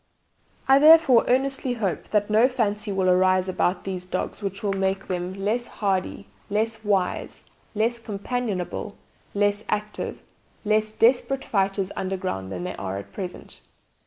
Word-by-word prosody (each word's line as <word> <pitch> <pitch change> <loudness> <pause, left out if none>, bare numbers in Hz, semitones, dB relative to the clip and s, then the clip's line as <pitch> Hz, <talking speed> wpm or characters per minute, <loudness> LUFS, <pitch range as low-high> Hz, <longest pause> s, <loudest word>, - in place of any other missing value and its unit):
"I 270 +1 +7
therefore 305 -5 +7
earnestly 265 0 +1
hope 200 -9 -2
that 205 -1 +1
no 220 +4 +5
fancy 210 -4 -1
will 190 -1 0
arise 185 0 +3
about 185 0 0
these 185 -2 -4
dogs 180 - -4
which 195 0 -4
will 200 -1 +1
make 195 0 -1
them 180 0 -3
less 215 +5 -1
hardy, 195 -1 -2 0.2
less 220 +2 -1
wise, 195 -3 -1 0.3
less 230 +3 +1
companionable, 210 -3 -4 0.4
less 205 +1 +1
active, 210 0 -2
or 210 - -15
less 215 0 +3
desperate 250 +4 +2
fighters 195 -1 0
underground 185 - -3
than 90 -2 -4
they 90 - -4
are 95 0 -4
at 100 - -9
present. 185 -3 -7
205 Hz, 145 wpm, -24 LUFS, 185-225 Hz, 0.4 s, I